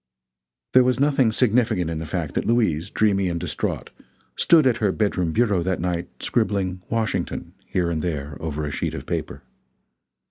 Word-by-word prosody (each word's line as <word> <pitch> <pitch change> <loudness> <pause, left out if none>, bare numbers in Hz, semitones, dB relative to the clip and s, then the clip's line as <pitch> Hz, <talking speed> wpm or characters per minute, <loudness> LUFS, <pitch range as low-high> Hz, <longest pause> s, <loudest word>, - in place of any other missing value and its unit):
There 130 - +7
was 125 0 +1
nothing 135 -5 +3
significant 110 -7 +2
in 80 - -3
the 80 - -5
fact 80 -4 -3
that - - -1
Louise, 100 -7 +1
dreamy 100 -4 +2
and 85 -1 -2
distraught, 80 -5 -3 0.4
stood 160 -4 +5
at 125 -3 +3
her 105 -4 +1
bedroom 95 -5 0
bureau 105 -2 +2
that 95 +1 -1
night, 85 0 -2 0.2
scribbling 100 -5 0
"Washington" 110 -6 -2
here 85 -2 0
and 80 -2 -1
there 75 -4 -3
over 75 -1 -3
a 75 - -3
sheet - - -2
of - - -7
paper. - - -4
95 Hz, 170 wpm, -23 LUFS, 85-115 Hz, 0.4 s, There